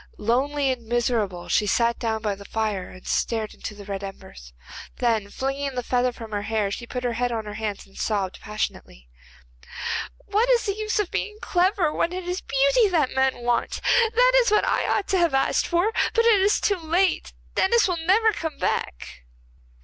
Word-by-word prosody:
Lonely 270 Hz, +5 st, +1 dB
and 240 Hz, -3 st, -6 dB
miserable 225 Hz, -7 st, -1 dB
she 210 Hz, -, +2 dB
sat 235 Hz, +3 st, +2 dB
down 220 Hz, -2 st, -2 dB
by 210 Hz, -2 st, 0 dB
the 200 Hz, +1 st, -10 dB
fire 210 Hz, -3 st, -2 dB
and 185 Hz, -, -14 dB
stared 220 Hz, -2 st, -1 dB
into 210 Hz, -, -7 dB
the 205 Hz, -1 st, -11 dB
red 200 Hz, 0 st, -5 dB
embers. 65 Hz, -, -10 dB, 0.5 s
Then, 225 Hz, -4 st, 0 dB
flinging 275 Hz, +3 st, -3 dB
the 250 Hz, -, -2 dB
feather 250 Hz, +1 st, +1 dB
from 225 Hz, -2 st, -10 dB
her 205 Hz, -1 st, -2 dB
hair, 210 Hz, -1 st, -1 dB
she 235 Hz, +4 st, -5 dB
put 250 Hz, +1 st, -5 dB
her 245 Hz, -1 st, 0 dB
head 245 Hz, +1 st, -1 dB
on 225 Hz, -2 st, -3 dB
her 210 Hz, -, -6 dB
hands, 210 Hz, -2 st, -4 dB
and 195 Hz, -, -22 dB
sobbed 200 Hz, -4 st, -2 dB
passionately. 210 Hz, -, -5 dB, 1.2 s
'What 430 Hz, +4 st, +1 dB
is 475 Hz, -3 st, +3 dB
the 400 Hz, -, 0 dB
use 430 Hz, +1 st, -2 dB
of 415 Hz, -4 st, 0 dB
being 425 Hz, 0 st, -3 dB
clever 360 Hz, -4 st, +1 dB
when 340 Hz, -, 0 dB
it 370 Hz, 0 st, -4 dB
is 360 Hz, +1 st, -2 dB
beauty -, -, +3 dB
that 315 Hz, -8 st, +1 dB
men 265 Hz, -2 st, +1 dB
want? 240 Hz, -1 st, 0 dB, 0.4 s
That -, -, +5 dB
is 470 Hz, -, +1 dB
what 425 Hz, 0 st, +3 dB
I -, -, +1 dB
ought 405 Hz, -, 0 dB
to 380 Hz, -, +2 dB
have 335 Hz, -5 st, +2 dB
asked 270 Hz, -, +2 dB
for. 350 Hz, +5 st, +2 dB, 0.2 s
But 460 Hz, 0 st, +3 dB
it 440 Hz, -4 st, +5 dB
is 400 Hz, +2 st, +3 dB
too 400 Hz, -2 st, +1 dB
late, 345 Hz, +3 st, 0 dB, 0.2 s
Denis 455 Hz, +4 st, +3 dB
will 360 Hz, -2 st, -1 dB
never 410 Hz, +7 st, +3 dB
come 320 Hz, -5 st, -4 dB
back. -, -, -3 dB
255 Hz, 195 wpm, -24 LUFS, -, 1.2 s, That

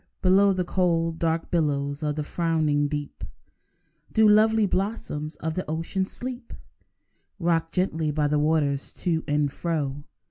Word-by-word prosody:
Below 195 Hz, +2 st, +5 dB
The 185 Hz, -1 st, 0 dB
cold, 165 Hz, -2 st, 0 dB
dark 165 Hz, 0 st, -1 dB
billows 145 Hz, -3 st, 0 dB
of 150 Hz, -1 st, -1 dB
the 150 Hz, -, -2 dB
frowning 155 Hz, -3 st, +1 dB
deep 145 Hz, 0 st, -5 dB, 0.9 s
Do 220 Hz, -1 st, +5 dB
lovely 215 Hz, +1 st, +5 dB
blossoms 185 Hz, -6 st, -2 dB
of 160 Hz, +1 st, -4 dB
the 185 Hz, -, -2 dB
ocean 165 Hz, +4 st, -1 dB
sleep, 245 Hz, +1 st, -6 dB, 0.8 s
Rocked 165 Hz, -3 st, 0 dB
gently 165 Hz, -4 st, 0 dB
by 150 Hz, 0 st, 0 dB
the 150 Hz, 0 st, +1 dB
waters 145 Hz, -2 st, 0 dB
to 165 Hz, -3 st, -1 dB
and 145 Hz, -1 st, +1 dB
fro. 145 Hz, -4 st, -3 dB
165 Hz, 140 wpm, -25 LUFS, 150-185 Hz, 0.9 s, Below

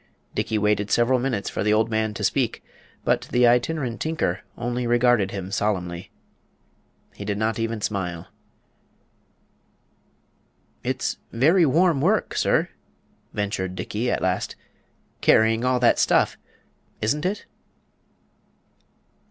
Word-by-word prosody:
Dickey 110 Hz, -, -1 dB
waited 105 Hz, -1 st, +1 dB
several 125 Hz, +2 st, +3 dB
minutes 120 Hz, -6 st, -2 dB
for -, -, -2 dB
the 105 Hz, -, +2 dB
old 110 Hz, +1 st, +3 dB
man 110 Hz, 0 st, 0 dB
to -, -, -5 dB
speak; -, -, 0 dB, 0.4 s
but -, -, +1 dB
the 125 Hz, 0 st, +3 dB
Itinerant 125 Hz, +1 st, +1 dB
Tinker 155 Hz, -, -1 dB, 0.2 s
only 120 Hz, 0 st, -2 dB
regarded 120 Hz, -4 st, +3 dB
him 95 Hz, -1 st, -6 dB
solemnly. 90 Hz, -4 st, -2 dB, 1.0 s
He -, -, -8 dB
did 100 Hz, 0 st, -2 dB
not 110 Hz, +2 st, -1 dB
even 115 Hz, -1 st, -2 dB
smile. 90 Hz, -5 st, -3 dB, 2.6 s
"It's -, -, -2 dB
very 160 Hz, +8 st, +4 dB
warm 165 Hz, 0 st, +3 dB
work, 200 Hz, +8 st, +1 dB
sir," -, -, +2 dB, 0.6 s
ventured 100 Hz, -3 st, -3 dB
Dickey, 110 Hz, +6 st, -2 dB
at -, -, -1 dB
last, 95 Hz, 0 st, -1 dB, 0.7 s
"carrying 110 Hz, +1 st, +4 dB
all 125 Hz, 0 st, +2 dB
that 120 Hz, -, +4 dB
stuff -, -, +3 dB, 0.6 s
isn't 145 Hz, +8 st, 0 dB
it?" 205 Hz, +2 st, -4 dB
115 Hz, 120 wpm, -24 LUFS, 100-125 Hz, 2.6 s, very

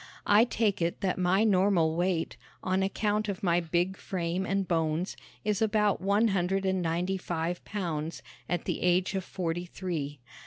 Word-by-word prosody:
I 210 Hz, +3 st, +6 dB
take 220 Hz, -6 st, 0 dB
it 170 Hz, +3 st, -1 dB
that 185 Hz, -2 st, 0 dB
my 185 Hz, +3 st, +3 dB
normal 185 Hz, -6 st, +3 dB
weight, 175 Hz, -1 st, 0 dB, 0.3 s
on 185 Hz, +1 st, +1 dB
account 210 Hz, +2 st, 0 dB
of 200 Hz, +2 st, -4 dB
my 175 Hz, -2 st, +3 dB
big 175 Hz, +3 st, 0 dB
frame 180 Hz, 0 st, -2 dB
and 195 Hz, -1 st, 0 dB
bones, 165 Hz, +1 st, 0 dB, 0.3 s
is 210 Hz, -1 st, 0 dB
about 210 Hz, -3 st, +2 dB
one 200 Hz, +4 st, +3 dB
hundred 195 Hz, 0 st, 0 dB
and 190 Hz, -1 st, +1 dB
ninety 175 Hz, +3 st, 0 dB
five 175 Hz, -1 st, -3 dB
pounds, 165 Hz, -6 st, -3 dB, 0.3 s
at 175 Hz, -1 st, -1 dB
the -, -, -2 dB
age 180 Hz, +2 st, +2 dB
of 190 Hz, -1 st, -1 dB
forty 175 Hz, -1 st, -3 dB
three. 155 Hz, -6 st, -4 dB
185 Hz, 165 wpm, -29 LUFS, 170-195 Hz, 0.3 s, I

